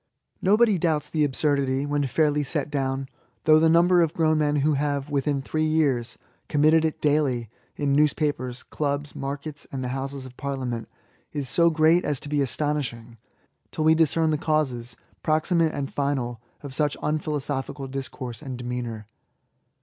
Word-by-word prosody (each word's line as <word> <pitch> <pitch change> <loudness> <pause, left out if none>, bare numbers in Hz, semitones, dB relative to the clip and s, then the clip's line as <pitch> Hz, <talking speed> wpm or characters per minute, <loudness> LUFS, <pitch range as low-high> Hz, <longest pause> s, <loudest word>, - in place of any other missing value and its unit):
No 200 +3 +4
body 215 -5 +4
doubts 160 -3 0
the 155 -2 +2
absurdity, 140 -1 +1
when 145 0 0
fairly 150 +2 +2
set 145 +1 -2
down; 135 -1 -1 0.4
though 155 0 +6
the 160 0 +4
number 175 +2 +5
of 165 -1 +1
grown 155 -1 +2
men 150 -1 +2
who 150 +1 +2
have, 145 0 -1
within 140 -1 0
three 155 +2 0
years, 135 -7 +1 0.3
committed 155 +2 +4
it 160 -1 -1
daily 140 -7 +1 0.2
in 145 -1 0
news 150 +1 +4
papers, 130 -5 -2
clubs, 145 -1 -3
markets, 140 +2 -5
and 130 -1 -4
the 125 - -3
Houses 135 +1 -4
of 130 -1 -11
Parlia 140 -2 -3
ment, 115 -2 -4 0.4
is 140 -4 -2
so 170 +4 +4
great 160 +2 +4
as 145 -3 -1
to 145 - -5
be 145 -1 +1
astonishing, 125 -5 -2 0.5
till 155 - -2
we 160 0 +6
discern 160 0 +2
the 150 - 0
causes, 130 -7 -1 0.2
proximate 160 +1 +2
and 140 -2 -4
final, 130 -5 -1 0.2
of 140 -2 -7
such 150 +1 +1
unphilosophical 145 -2 -2
discourse 130 -2 -6
and 130 -4 -6
demeanour. 120 -3 -5
145 Hz, 165 wpm, -25 LUFS, 135-155 Hz, 0.5 s, though